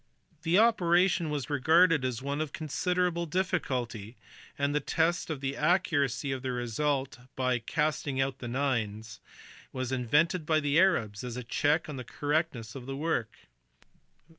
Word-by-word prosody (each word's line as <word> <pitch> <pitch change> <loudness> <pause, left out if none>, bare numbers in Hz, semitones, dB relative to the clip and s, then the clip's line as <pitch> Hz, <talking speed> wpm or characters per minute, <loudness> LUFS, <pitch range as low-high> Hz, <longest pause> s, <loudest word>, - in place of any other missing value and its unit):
The 170 +3 +2
operation 180 -6 +3
was 145 -2 -3
regarded 160 +2 +4
as 130 -1 -2
one 140 +2 -2
of 155 -2 -3
considerable 170 +2 -1
difficulty, 130 - -2 0.4
and 140 0 0
the 150 - +2
test 165 +3 0
of 150 -4 -4
the 135 0 -2
accuracy 145 -7 +1
of 135 -1 -3
the 130 0 -2
result 130 +3 -1 0.2
by 130 -1 +1
"casting 145 +1 -1
out 135 0 -1
the 120 - -6
nines" 110 -5 -2 0.5
was 130 -1 -4
invented 150 +8 +2
by 155 0 +2
the 145 +1 +2
Arabs 115 - +2
as 125 -1 -5
a 125 - -4
check 150 +6 +1
on 150 -3 -6
the 125 - -5
correctness 145 -4 -2
of 130 -2 -9
the 135 - -4
work. 145 -8 -2
140 Hz, 155 wpm, -29 LUFS, 125-165 Hz, 0.5 s, regarded